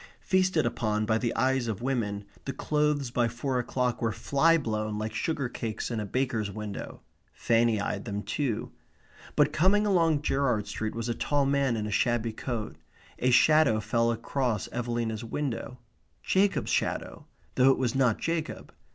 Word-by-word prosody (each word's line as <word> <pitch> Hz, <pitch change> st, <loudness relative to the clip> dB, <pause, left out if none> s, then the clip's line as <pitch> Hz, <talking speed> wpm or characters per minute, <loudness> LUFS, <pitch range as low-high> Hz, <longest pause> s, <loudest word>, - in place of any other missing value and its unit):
Feasted 185 Hz, -5 st, +2 dB
upon 110 Hz, -2 st, 0 dB
by 110 Hz, +1 st, +1 dB
the 120 Hz, -1 st, 0 dB
eyes 130 Hz, -2 st, +1 dB
of 110 Hz, +1 st, -3 dB
women, 105 Hz, -6 st, -1 dB, 0.2 s
the 135 Hz, -, -3 dB
clothes 150 Hz, -2 st, 0 dB
by 120 Hz, -1 st, +2 dB
four 125 Hz, +2 st, -2 dB
o'clock 125 Hz, 0 st, -1 dB
were 115 Hz, -1 st, +1 dB
flyblown 115 Hz, -6 st, +1 dB
like 110 Hz, +1 st, -3 dB
sugar 155 Hz, -5 st, -1 dB
cakes 115 Hz, -1 st, -4 dB
in 115 Hz, -, -1 dB
a 105 Hz, -, -4 dB
baker's 120 Hz, -3 st, -1 dB
window. 105 Hz, 0 st, -6 dB, 0.3 s
Fanny 115 Hz, -2 st, +2 dB
eyed 100 Hz, 0 st, -3 dB
them 105 Hz, -2 st, -4 dB
too. 130 Hz, -7 st, -2 dB, 0.6 s
But -, -, +3 dB
coming 195 Hz, +6 st, +3 dB
along 165 Hz, -7 st, +2 dB
Gerrard 130 Hz, -8 st, +1 dB
Street 110 Hz, 0 st, -4 dB
was 115 Hz, 0 st, -3 dB
a 120 Hz, -, 0 dB
tall 145 Hz, +4 st, 0 dB
man 135 Hz, -3 st, +2 dB
in 105 Hz, -, -2 dB
a 105 Hz, -, -4 dB
shabby 115 Hz, +1 st, +1 dB
coat. 110 Hz, -1 st, -4 dB, 0.4 s
A 125 Hz, -, +2 dB
shadow 155 Hz, -3 st, +5 dB
fell 115 Hz, +2 st, +1 dB
across 115 Hz, -1 st, -1 dB
Evelina's 120 Hz, -2 st, -2 dB
window 125 Hz, 0 st, -4 dB, 0.5 s
Jacob's 195 Hz, +1 st, +1 dB
shadow, -, -, -2 dB, 0.3 s
though 130 Hz, +1 st, +5 dB
it 135 Hz, -, +4 dB
was 125 Hz, -3 st, 0 dB
not 130 Hz, -5 st, +2 dB
Jacob. 165 Hz, -1 st, -3 dB
120 Hz, 160 wpm, -28 LUFS, 110-140 Hz, 0.6 s, shadow